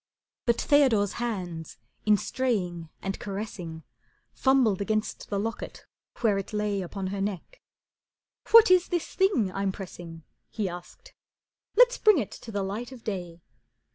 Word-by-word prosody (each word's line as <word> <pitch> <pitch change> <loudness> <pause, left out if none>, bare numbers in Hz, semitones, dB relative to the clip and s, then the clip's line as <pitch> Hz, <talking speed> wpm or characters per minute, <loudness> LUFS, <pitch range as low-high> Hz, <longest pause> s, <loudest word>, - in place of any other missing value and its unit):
But 235 -1 +3
Theodore's 250 -9 +4
hands 180 - -4 0.3
in 210 -1 +6
straying 180 -10 -2
and 195 0 -3
caressing 195 -5 -6 0.5
Fumbled 255 -7 +3
against 215 +1 -2
the 200 - -1
locket 225 +3 -5 0.4
where 210 -4 +3
it 195 - -7
lay 210 -2 0
Upon 190 +1 -4
her 200 - -3
neck. 205 - -4 0.9
"What 455 -3 +8
is 365 -1 +5
this 350 -3 -2
thing 365 - +2
I'm 195 +1 -1
pressing?" 175 -4 -9 0.3
He 215 -3 -2
asked. 180 - -10 0.6
"Let's - - +6
bring 425 -3 +6
it 230 -9 -2
to 225 - -9
the 200 -2 -1
light 215 +6 -4
of 250 -3 -11
day." 175 -5 -5
205 Hz, 140 wpm, -27 LUFS, 190-245 Hz, 0.9 s, What